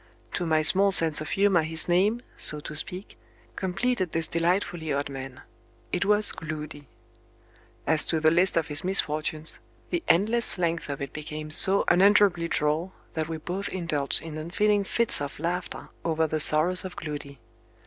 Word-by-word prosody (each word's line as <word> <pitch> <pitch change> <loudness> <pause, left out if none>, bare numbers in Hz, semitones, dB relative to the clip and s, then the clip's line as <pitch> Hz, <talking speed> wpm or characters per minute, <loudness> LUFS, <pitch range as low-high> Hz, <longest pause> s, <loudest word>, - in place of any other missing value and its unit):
To 175 - -3
my 155 -1 +1
small 195 +5 +5
sense 160 -5 +4
of 155 - -7
humor 195 -3 +2
his 160 0 +2
name, 200 +7 0
so 150 - +7
to 150 - -9
speak, 180 +5 -3 0.4
completed 190 0 -3
this 165 0 -2
delightfully 170 -1 -2
odd 140 0 -3
man: 135 -1 -9 0.5
it 180 +2 -2
was 210 0 +5
Gloody. 150 -2 -8 1.0
As 160 -1 0
to 160 - 0
the 155 0 +2
list 180 +2 +1
of 165 -1 -1
his 145 -1 +1
misfortunes, 155 -4 0 0.3
the 345 - -2
endless 220 +6 +2
length 170 -3 -3
of 140 0 -5
it 140 - -8
became 150 0 -8
so 195 +5 +5
unendurably 190 -2 +3
droll, 155 +4 -2 0.2
that 160 -1 -4
we 165 - -5
both 180 +5 -6
indulged 160 -6 +1
in 155 -1 -8
unfeeling 205 +6 0
fits 235 -5 +1
of 140 -1 -6
laughter 175 +2 -5
over 160 -1 -1
the 155 0 -3
sorrows 155 +5 +4
of 185 -2 -8
Gloody. 145 -4 -8
165 Hz, 165 wpm, -25 LUFS, 155-190 Hz, 1.0 s, so